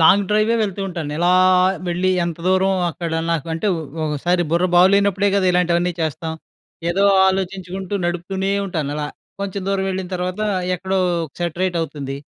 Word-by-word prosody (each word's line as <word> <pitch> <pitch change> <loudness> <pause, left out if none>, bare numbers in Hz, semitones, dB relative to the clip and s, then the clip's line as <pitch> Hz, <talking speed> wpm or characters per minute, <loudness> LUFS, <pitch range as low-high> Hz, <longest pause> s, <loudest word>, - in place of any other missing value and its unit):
Long 195 +5 +6
డ్రైవే 215 +2 +3
వెళ్తూ 200 -1 -3
ఉంటాను. 170 -5 -5
ఇలా, 175 +1 +3 0.6
వెళ్ళి 180 +2 0 0.2
ఎంత 170 -1 -4
దూరం 190 +1 +3 0.2
అక్కడ 165 0 -5 0.2
నాకు 165 -3 -2
అంటే 165 +6 -2
ఒ - - -4 0.3
ఒకసారి 175 +4 0
బుర్ర 170 +2 +2
బాగు 180 +1 +7
లేనప్పుడే 200 0 +2
కదా! 190 - +2
ఇలాంటివన్నీ 175 0 +2
చేస్తాం. 160 +1 -2 0.6
ఏదో 195 +3 +2 0.2
ఆలోచించుకుంటూ 190 0 -3
నడుపుతూనే 180 +3 -2 0.2
ఉంటానలా. 150 -4 -3 0.3
కొంచెం 200 -1 -3
దూరం 195 -1 0
వెళ్ళిన 185 -1 -4
తర్వాత 180 +3 -3 0.3
ఎక్కడో 190 +2 -2 0.4
సెట్రైట్ 175 +1 -1
అవుతుంది. 140 -4 -5
180 Hz, 145 wpm, -20 LUFS, 170-190 Hz, 0.6 s, బాగు